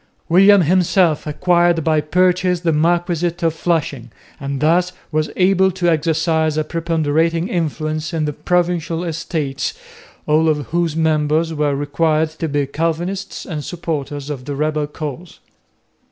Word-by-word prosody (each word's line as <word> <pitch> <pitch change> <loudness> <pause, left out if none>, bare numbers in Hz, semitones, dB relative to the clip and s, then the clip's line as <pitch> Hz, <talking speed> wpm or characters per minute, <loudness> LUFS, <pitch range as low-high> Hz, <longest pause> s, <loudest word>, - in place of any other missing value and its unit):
William 195 +3 +6
himself 175 -1 +2
acquired 175 +1 +2
by 155 -1 +2
purchase 180 +2 +1
the 165 -2 +1
marquisate 170 +2 0
of 165 -1 +2
Flushing 160 -6 -2 0.3
and 140 -1 -4
thus 175 +4 +2 0.2
was 155 0 0
able 190 0 +3
to 185 -1 -2
exercise 160 0 +1
a 155 - +1
preponderating 165 +1 0
influence 155 -3 -2
in 160 -2 -1
the 150 - -2
Provincial 175 0 -1
Estates, 155 - -3 0.5
all 155 +1 +3
of 150 -3 0
whose 170 -2 0
members 160 0 +1
were 150 -2 0
required 155 +2 0
to 160 +1 -5
be 145 0 0
Calvinists 165 +7 -3
and 155 -5 -5
supporters 150 -4 -4
of 130 -3 -6
the 145 0 -4
rebel 150 0 -1
cause. 150 +3 -7
160 Hz, 140 wpm, -19 LUFS, 150-175 Hz, 0.5 s, William